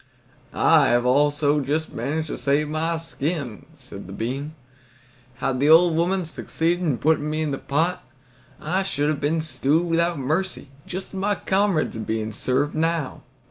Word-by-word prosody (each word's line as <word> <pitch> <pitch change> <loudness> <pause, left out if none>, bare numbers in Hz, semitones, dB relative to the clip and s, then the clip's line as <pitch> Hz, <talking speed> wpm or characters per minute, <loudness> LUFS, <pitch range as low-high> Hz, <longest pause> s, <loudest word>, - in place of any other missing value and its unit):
"I - - +5
have 120 0 +2
also 145 +3 +3
just 150 +3 -2
managed 155 +2 -2
to - - -4
save 145 +2 +1
my 165 +2 -1
skin," 145 - -4
said - - -10
the - - -9
bean. 135 +8 -4 0.8
"Had 130 0 -2
the 145 +2 +3
old 165 +1 +6
woman 180 +2 +1
succeeded 165 +2 -1
in 145 -8 +1
putting 150 -1 +1
me 155 +1 -1
into 145 -3 -2
the - - -16
pot, 160 +6 0 0.6
I 180 +5 -1
should 150 -7 -1
have 150 -2 -2
been 155 +3 +1
stewed 155 +2 +1
without 170 0 +1
mercy, 155 +3 -2 0.2
just 185 +1 -5
as - - -21
my 205 +1 +1
comrades 190 - +1
are - - -5
being 110 0 -2
served 130 +6 0
now." 165 -2 -1
155 Hz, 170 wpm, -23 LUFS, 140-165 Hz, 0.8 s, old